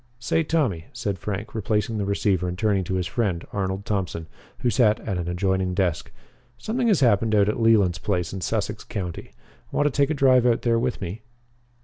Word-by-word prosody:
"Say, 125 +7 0
Tommy," 140 - 0
said 105 -6 -3
Frank, 105 +3 -5
replacing 110 0 -1
the 100 - -1
receiver 100 -2 +1
and 90 0 -4
turning 100 -2 +1
to 95 - -2
his 90 -1 0
friend, 95 -4 -1
Arnold 95 0 -2
Thompson, 95 -5 -2 0.4
who 120 - +2
sat 110 -1 +3
at 95 -5 -3
an 85 - -3
adjoining 95 +1 0
desk, 90 -4 -1 0.5
"something 240 +2 -1
has 200 -9 +3
happened 110 -3 +3
out 100 -1 +4
at 105 - -1
Leland's 105 -7 +4
place 90 -2 -1
in 95 - -5
Sussex 105 +1 -2
County. 90 -5 -5 0.4
Want 145 - +1
to 150 - +3
take 140 +1 +2
a 155 - 0
drive 130 -3 +4
out 115 -1 +2
there 115 -1 +2
with 125 +1 -2
me?" 95 +4 -5
105 Hz, 200 wpm, -24 LUFS, 95-120 Hz, 0.5 s, out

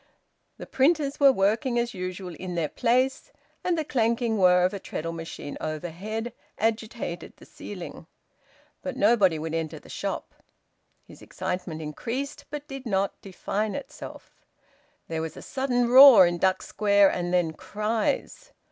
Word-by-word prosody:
The - - -8
printers 285 0 +1
were 280 -1 +7
working 235 +4 +1
as 235 0 0
usual 185 -1 -5
in 180 +2 -6
their 160 -3 -1
place, 255 +2 0 0.3
and 355 -2 +1
the 315 - -1
clanking 230 -4 0
whirr 180 -1 +5
of 185 - 0
a 200 - -4
treadle 165 -2 -5
machine 165 -3 -7
overhead 180 +9 -4 0.2
agitated 220 -5 -3
the - - -15
ceiling. - - -9 0.7
But - - -5
nobody 195 -8 +4
would 160 +1 -4
enter 165 -2 -3
the - - -15
shop. - - -4 0.7
His - - -15
excitement 175 -3 -4
increased, 240 - -5
but 295 0 -6
did 270 -2 -7
not 195 -2 -1
define 205 +2 -3
itself. 280 -1 -10 0.6
There 160 -1 -3
was 160 -1 -6
a - - -9
sudden 255 -3 0
roar 255 -5 +10
in 175 0 -1
Duck 190 +1 +2
Square, 200 -2 +3
and 175 0 -2
then 175 -3 +1
cries. 215 - -2
205 Hz, 150 wpm, -26 LUFS, 175-245 Hz, 0.7 s, roar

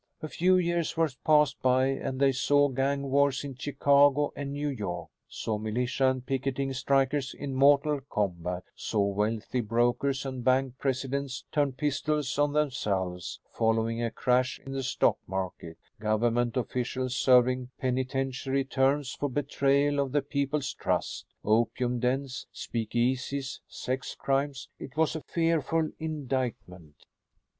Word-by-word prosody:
A - - -2
few 185 +4 +3
years 170 -2 0
were 165 -2 +2
passed 150 -2 +3
by 130 0 +4
and 135 -1 -2
they 135 -1 +5
saw 145 +2 +3
gang 135 +1 -1
wars 140 0 +3
in 140 -1 -5
Chicago 145 +1 +3
and 140 0 -4
New 145 +1 -2
York; 95 -10 -4 0.2
saw 110 -2 -3
militia 125 +5 +1
and 130 -1 -3
picketing 135 0 -1
strikers 135 +1 +1
in 140 -2 -5
mortal 140 +2 +4
combat; 90 -3 -2
saw 105 -3 0
wealthy 105 +4 -1
brokers 120 +5 +1
and 130 -2 -4
bank 130 0 +1
presidents 135 0 -2
turn 145 -3 +1
pistols 145 0 -1
on 145 0 +3
themselves 100 - -1
following 115 +1 +1
a 115 - 0
crash 125 +2 +1
in 135 - -6
the 135 0 -2
stock 130 - +1
market; 95 -3 -4 0.2
government 115 +3 +1
officials 125 +1 -2
serving 125 0 +4
penitentiary 130 +1 -1
terms 135 0 +1
for 145 - -2
betrayal 140 +1 +1
of 140 -2 -1
the 145 -2 +2
people's 140 -1 -1
trust; - - -2 0.2
opium 120 +3 +1
dens, 130 +2 -1
speakeasies, 125 +4 -2
sex 130 +1 -4
crimes. 135 -1 -1
It 140 +3 -9
was 160 0 +2
a 160 - -3
fearful 165 -1 0
indictment. 130 - -4
135 Hz, 135 wpm, -28 LUFS, 120-140 Hz, 0.2 s, they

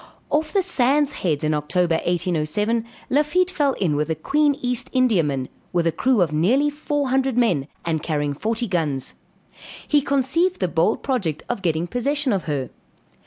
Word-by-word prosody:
Off 310 +1 +1
the 395 -2 +2
Sand 285 -3 +2
Heads 155 - -2
in 155 0 +1
October, 165 +4 0
1807, 180 +7 0 0.3
Lafitte 300 +7 +2
fell 290 -6 +1
in 170 -10 0
with 150 +1 0
the 160 - -1
Queen 290 - +2
East 245 -1 -2
Indiaman, 165 - +2 0.3
with 175 -1 +1
a 165 - +3
crew 250 +3 +2
of 155 -3 -3
near 250 - +2
four 290 -2 -2
hundred 265 -1 +1
men, 180 - +2 0.2
and 160 -2 -1
carrying 145 -3 -1
forty 225 - -2
guns; 155 -8 -1 0.7
he 295 -1 +3
conceived 280 +7 +1
the 185 - +1
bold 170 +5 +1
project 195 - -1
of 240 -5 -3
getting 165 -2 0
possession 265 +6 0
of 195 - -2
her. 140 -5 -3
215 Hz, 165 wpm, -22 LUFS, -, 0.7 s, a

